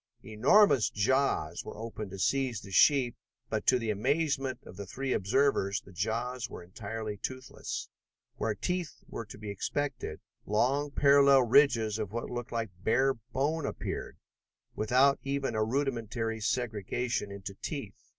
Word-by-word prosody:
Enormous 125 - +5
jaws 105 - +1
were - - -8
opened 110 -2 -6
to 95 - -8
seize 130 +2 0
the 100 - -11
sheep 130 +2 +5 0.4
but, - - -2
to 130 - +6
the 115 -3 -1
amazement 135 +3 0
of - - -11
the 100 0 -7
three 135 +6 -2
observers, 100 -2 +2
the 95 - -16
jaws 115 +7 -2
were - - -8
entirely 105 +3 -5
toothless. 130 +4 -5 0.5
Where 110 -2 -1
teeth 180 - -3
were 115 - -6
to 105 - -10
be 105 -1 -6
expected, 125 - -3 0.2
long 135 +8 +1
parallel 140 -1 +6
ridges 115 -4 +4
of 105 -3 -3
what 120 +1 -4
looked 120 -1 -5
like 115 -4 -2
bare 135 +4 +3
bone, 135 +7 -2
appeared, - - -5 0.6
without 130 +6 +3
even 140 -2 -2
a 110 -1 +1
rudimentary 115 -3 -1
segregation 115 -1 -1
into 100 -1 -7
teeth. - - -6
120 Hz, 145 wpm, -30 LUFS, 105-135 Hz, 0.6 s, to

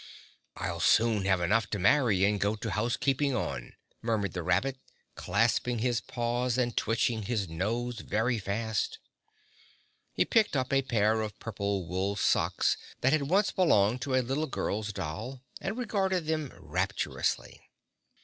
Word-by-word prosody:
"I'll - - -3
soon 110 -4 +3
have 95 -2 +2
enough 105 +5 +2
to 105 - -1
marry 100 -1 +3
and 105 0 +1
go 105 +1 +1
to 105 - -4
house 120 +4 0
keeping 135 0 +1
on," 65 -9 -4 0.3
murmured 110 -4 -1
the 90 - -3
rabbit, 125 +12 0 0.3
clasping 115 +3 +1
his 120 +1 0
paws 120 0 -1
and 120 -2 0
twitching 115 0 +1
his 105 -2 -1
nose 115 +8 -2
very 110 +4 0
fast. 105 +2 -2 1.1
He - - +1
picked 220 -8 +2
up 130 +1 -1
a 135 - +4
pair 110 -3 +2
of 105 -1 -5
purple 100 -4 -3
wool 95 +3 -1
socks 100 - +2 0.2
that 135 +3 +3
had 145 -2 +1
once 195 +3 +3
belonged 120 - +3
to 130 0 -1
a 130 - +3
little 140 +5 -1
girl's 105 -4 -2
doll 110 - -5 0.2
and 195 +5 -3
regarded 190 -7 0
them 155 -3 -1
rapturously. - - -2
115 Hz, 150 wpm, -29 LUFS, 100-130 Hz, 1.1 s, a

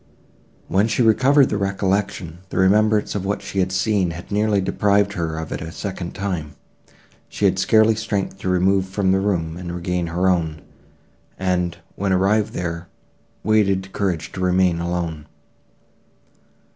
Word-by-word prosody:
When 100 +3 +2
she 115 +2 +1
recovered 130 +5 +4
her 105 - 0
recollection, 95 -3 -1
the - - -5
remembrance 105 +3 +3
of 100 - -3
what 100 0 -2
she 100 -1 -3
had 95 0 +1
seen 95 -1 +1
had 85 +4 -8
nearly 105 0 +2
deprived 100 +1 +1
her 80 -4 -3
of 80 -1 -5
it - - -4
a 80 +1 -6
second 95 -1 -6
time. 85 -7 -4 0.7
She 105 - -2
had 95 -1 +2
scarcely 110 +3 +4
strength 105 -3 -3
to 95 - -3
remove 95 +1 +2
from 95 -1 +1
the 95 - +3
room, 85 -5 -1
and 90 -1 -6
regain 90 0 -2
her 90 +3 0
own; 80 -4 0 0.7
and, 90 -2 -1 0.2
when 100 0 -1
arrived 100 +3 +2
there, 85 0 -4 0.6
wanted 100 -3 +1
courage 90 -5 -2
to - - -8
remain 90 -1 +2
alone. 85 -3 -3
95 Hz, 155 wpm, -21 LUFS, 85-100 Hz, 0.7 s, recovered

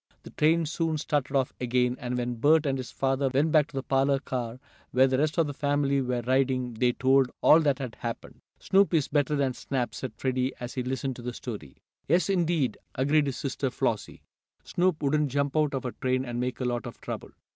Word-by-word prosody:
The - - -11
train 165 +2 +2
soon 160 0 -1
started 145 -2 -1
off 135 -2 +1
again, 125 0 +1
and 125 0 -3
when 120 0 -1
Bert 155 +5 +4
and 135 -2 +1
his 130 -2 -5
father 135 0 0
went 145 +4 +2
back 150 -2 +4
to - - -15
the 135 - -2
parlor 135 +1 +2
car 125 -3 -4 0.3
where 130 +1 +4
the 130 0 +1
rest 155 +2 0
of 165 - +4
the 145 - -4
family 140 -1 +1
were 125 -2 -2
riding 130 -1 +1
they 120 +2 +1
told 130 0 +3
all 155 - +7
that 145 -4 +2
had 130 -5 -5
happened. 115 -1 -6 0.2
"Snoop 195 -2 +3
is 150 -4 +2
better 145 0 +1
than 135 -3 +1
Snap," 125 -3 -3
said 130 -4 -5
Freddie 130 0 -1
as 120 0 -6
he 130 - -2
listened 130 +1 -3
to - - -8
the 125 0 -4
story. 100 - -7 0.3
"Yes, 175 +6 +2
indeed," 165 - +1 0.2
agreed 145 +3 +2
his 135 - -3
sister 135 -1 -2
Flossie. - - -2 0.4
"Snoop 175 -4 0
wouldn't 150 +1 +2
jump 140 +2 -1
out 150 -2 +2
of 130 - -4
a 125 - -2
train 130 +1 -1
and 120 -1 -4
make 125 0 -2
a 130 - -2
lot 120 -1 -2
of - - -10
trouble." - - -6
135 Hz, 220 wpm, -27 LUFS, 125-145 Hz, 0.4 s, all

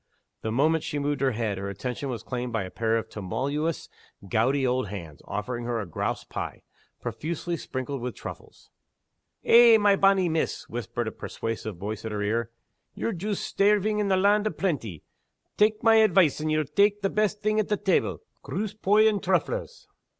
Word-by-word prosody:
The 110 - -2
moment 155 +7 +2
she 150 - -3
moved 145 0 -1
her 135 -2 +2
head, 110 -3 -2
her 100 0 -4
attention 125 +7 -4
was 120 -5 -4
claimed 125 -1 -4
by 115 -3 -1
a 95 - -8
pair 115 0 +1
of 110 -1 -3
tremulous 140 - -3 0.4
gouty 130 +7 +2
old 125 -2 0
hands, 85 -7 -8
offering 120 +4 -4
her 120 -1 -1
a 105 - -3
grouse 85 - -3
pie, - - -6 0.4
profusely 155 +9 -3
sprinkled 130 -3 -5
with 125 -1 -4
truffles. - - -10 0.7
"Eh, 235 -1 +8
my 205 -2 +4
bonny 195 -2 +4
Miss!" 160 -1 -1
whispered 120 0 -4
a - - -2
persuasive 110 -4 -5
voice 105 +3 -5
at 110 - -4
her 105 -1 -2
ear, 115 +2 0 0.5
"ye're 230 - -2
joost 200 +3 -3
stairving 210 +1 +2
in 200 -2 0
a 190 - +4
land 205 +2 +3
o' - - +2
plenty. 130 - -3 0.5
Tak' 215 +2 +2
my 225 -1 +6
advice, 190 -9 +4
and 155 0 -1
ye'll 155 0 +1
tak' 200 +8 +2
the 195 - +2
best 210 -1 0
thing 215 +1 +2
at 215 - 0 0.2
tebble 190 - +1 0.2
groose 210 0 -3
poy, 210 +1 +4
and 210 -3 +1
trufflers." 475 - -1
145 Hz, 180 wpm, -26 LUFS, -, 0.7 s, Eh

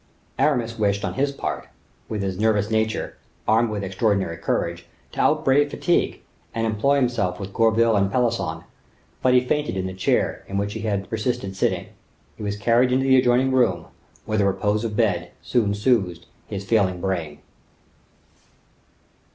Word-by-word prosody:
Aramis 120 -6 +1
wished 100 -1 +1
on - - -3
his 140 +1 0
part, 140 - -4 0.4
with 105 -2 -2
his 95 -1 -3
nervous 105 -1 +2
nature, 110 0 -1 0.3
armed 115 +2 +3
with 105 -2 -3
extraordinary 95 -2 0
courage, 85 +1 -2 0.2
to - - -8
outbrave 145 +2 +3
fatigue, 175 +4 0 0.3
and 115 0 0
employ 110 +6 +2
himself 115 -9 0
with 100 -1 -7
Gourville 115 0 +3
and 100 -1 +2
Pelisson, 120 -1 0 0.6
but 125 0 +4
he 125 0 +4
fainted 150 -5 -1
in 95 - -2
the 95 - -4
chair 95 - 0
in 100 - -3
which 100 +1 -1
he 110 - -5
had 100 -3 -2
persisted 110 -4 -2
sitting. - - -1 0.5
He - - -12
was 105 -1 -3
carried 120 +4 +3
into 130 +1 +2
the 130 -1 +5
adjoining 125 +1 +3
room, 120 -10 +1 0.4
where 110 0 -1
the 100 - +3
repose 105 +3 0
of 110 -2 -3
bed 90 -6 0
soon 105 -5 +1
soothed 100 -6 +1 0.2
his 100 -2 -5
failing 100 -5 +2
brain. 85 -6 -3
110 Hz, 160 wpm, -23 LUFS, 100-120 Hz, 0.6 s, the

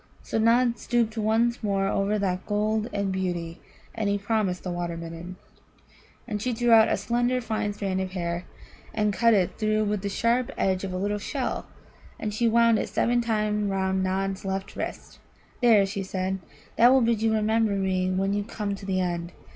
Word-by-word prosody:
So - - -2
Nod 235 +1 +3
stooped 235 -2 0
once 225 +2 +1
more 195 -2 0
over 200 +2 +1
that 185 -2 -2
gold 215 +2 0
and 200 -1 -1
beauty, 175 -3 -3 0.3
and 220 -3 -1
he 200 - +1
promised 200 -3 -1
the 180 - -3
Water 175 -1 -3
midden. 165 +2 -7 0.9
And 210 -3 -3
she 250 +2 -1
drew 240 +1 +1
out 225 -1 +8
a - - +1
slender, 245 +1 0
fine 220 -3 -2
strand 195 -2 -2
of 185 -1 -4
her 190 - -3
hair, 170 +1 -3 0.5
and 210 -2 +1
cut 230 +2 +4
it 185 -3 0
through 215 0 +1
with 210 -1 -1
the 200 - -2
sharp 235 +4 +1
edge 190 -1 +1
of 195 - -3
a 185 - -3
little 205 +2 -1
shell, 260 +5 -3 0.5
and 210 -1 -3
she 235 +3 +1
wound 230 -1 +4
it - - -3
seven 240 +1 +1
times 210 -2 0
round 190 -1 0
Nod's 195 +1 -1
left 195 0 -4
wrist. - - -6 0.4
"There," 225 -5 +6
she 195 0 -4
said; 190 0 -2 0.4
"that 240 +2 +7
will 265 0 +5
bid 230 -2 +1
you 220 0 +2
remember 220 0 +2
me 190 -1 0
when 195 +1 0
you 205 0 0
come 205 -1 -4
to 195 0 -8
the 190 -1 0
end. 175 -1 -3
205 Hz, 195 wpm, -26 LUFS, 190-225 Hz, 0.9 s, out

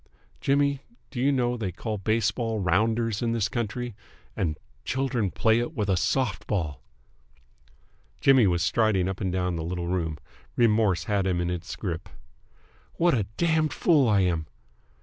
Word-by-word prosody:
Jimmy, 140 0 +1 0.3
do 125 - -3
you 140 +2 +3
know 125 -3 +1
they 105 -5 -3
call 105 +4 -4
baseball 110 +2 0
Rounders 110 +4 +1
in 115 -1 0
this 110 -3 +1
country, 120 +1 -3 0.4
and 80 -5 -1 0.3
children 130 -5 0
play 110 +4 +2
it 120 +7 -3
with 105 -4 -1
a 95 - +3
soft 100 +9 0
ball!" 75 - -2 1.4
Jimmy 130 -6 +5
was 85 -2 +1
striding 100 -1 +2
up 95 +1 -4
and 95 -2 0
down 90 -1 -1
the 80 - -3
little 85 +1 -3
room. 85 -3 -1 0.4
Remorse 105 -7 +3
had 100 -1 0
him 90 -2 +1
in 90 0 -1
its 90 0 -5
grip. 85 -5 -5 0.9
"What 175 0 +3
a 105 -6 0
damned 160 -2 +2
fool 145 -8 +3
I 100 -2 +4
am!" 85 -4 0
105 Hz, 160 wpm, -26 LUFS, 90-120 Hz, 1.4 s, Jimmy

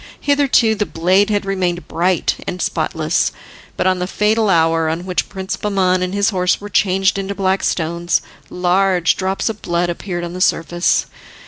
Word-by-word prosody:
Hitherto 280 -6 +3
the 210 -1 -2
blade 185 +5 +2
had 205 -1 0
remained 180 -4 -2
bright 175 +1 0
and 180 - -4
spotless, - - 0 0.5
but - - 0
on 185 -1 +2
the 180 - -2
fatal 215 +2 +1
hour 165 -2 +2
on 165 +3 -3
which 180 -1 -2
Prince 190 -1 -4
Bahman 185 -3 +1
and 180 0 -1
his 200 +1 +1
horse 180 -1 +1
were 205 - -8
changed 190 0 +2
into 195 +1 -4
black 190 0 0
stones, 170 +1 0 0.3
large 180 -1 +2
drops 190 +1 -2
of 220 -2 -3
blood 175 0 0
appeared 175 0 -5
on 170 0 -5
the 185 - -6
surface. 175 -1 +1
185 Hz, 175 wpm, -18 LUFS, 175-200 Hz, 0.5 s, Hitherto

